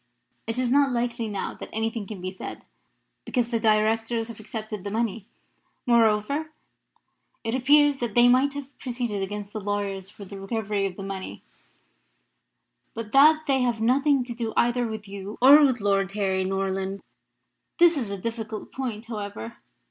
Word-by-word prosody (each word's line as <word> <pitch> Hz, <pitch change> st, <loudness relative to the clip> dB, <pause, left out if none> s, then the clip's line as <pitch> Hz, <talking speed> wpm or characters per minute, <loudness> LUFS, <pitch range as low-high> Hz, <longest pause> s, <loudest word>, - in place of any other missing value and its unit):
It 225 Hz, +1 st, -2 dB
is 250 Hz, -1 st, 0 dB
not 280 Hz, 0 st, +4 dB
likely 235 Hz, -1 st, -1 dB
now 200 Hz, -2 st, -3 dB
that -, -, -9 dB
anything 225 Hz, -1 st, -2 dB
can 200 Hz, -3 st, -7 dB
be 185 Hz, +1 st, -4 dB
said, 185 Hz, -, -8 dB, 0.6 s
because 245 Hz, -3 st, -1 dB
the 230 Hz, -1 st, 0 dB
Directors 225 Hz, +1 st, +1 dB
have 230 Hz, -, -9 dB
accepted 215 Hz, -2 st, -6 dB
the 200 Hz, -, -4 dB
money. 225 Hz, -1 st, -2 dB, 0.6 s
Moreover, 235 Hz, +5 st, +2 dB, 0.9 s
it 225 Hz, 0 st, -2 dB
appears 290 Hz, +2 st, +4 dB
that 235 Hz, -4 st, -3 dB
they 240 Hz, 0 st, +7 dB
might 260 Hz, +3 st, +4 dB
have 285 Hz, -1 st, -8 dB
proceeded 240 Hz, -5 st, -3 dB
against 205 Hz, +1 st, -5 dB
the 215 Hz, -, -4 dB
lawyers 200 Hz, -1 st, -3 dB
for 205 Hz, 0 st, -11 dB
the 195 Hz, +1 st, -9 dB
recovery 200 Hz, 0 st, -1 dB
of 185 Hz, -, -8 dB
the 195 Hz, -, -7 dB
money, 195 Hz, -1 st, -6 dB, 1.5 s
but 225 Hz, -2 st, -6 dB
that 310 Hz, +3 st, +6 dB
they 270 Hz, -2 st, +2 dB
have 240 Hz, -3 st, 0 dB
nothing 270 Hz, +4 st, +3 dB
to 245 Hz, -1 st, -6 dB
do 230 Hz, -2 st, -4 dB
either 240 Hz, 0 st, +2 dB
with 220 Hz, -2 st, -6 dB
you 200 Hz, +1 st, -7 dB
or 285 Hz, +4 st, +8 dB
with 260 Hz, -4 st, +3 dB
Lord 195 Hz, -2 st, +1 dB
Harry 190 Hz, -2 st, 0 dB
Norland. 195 Hz, 0 st, -2 dB, 0.7 s
That 345 Hz, -, +7 dB
is 290 Hz, -11 st, +2 dB
a 200 Hz, -, -4 dB
difficult 220 Hz, +1 st, -5 dB
point, 240 Hz, -4 st, -4 dB
however. 215 Hz, 0 st, -6 dB
225 Hz, 165 wpm, -25 LUFS, 200-245 Hz, 1.5 s, or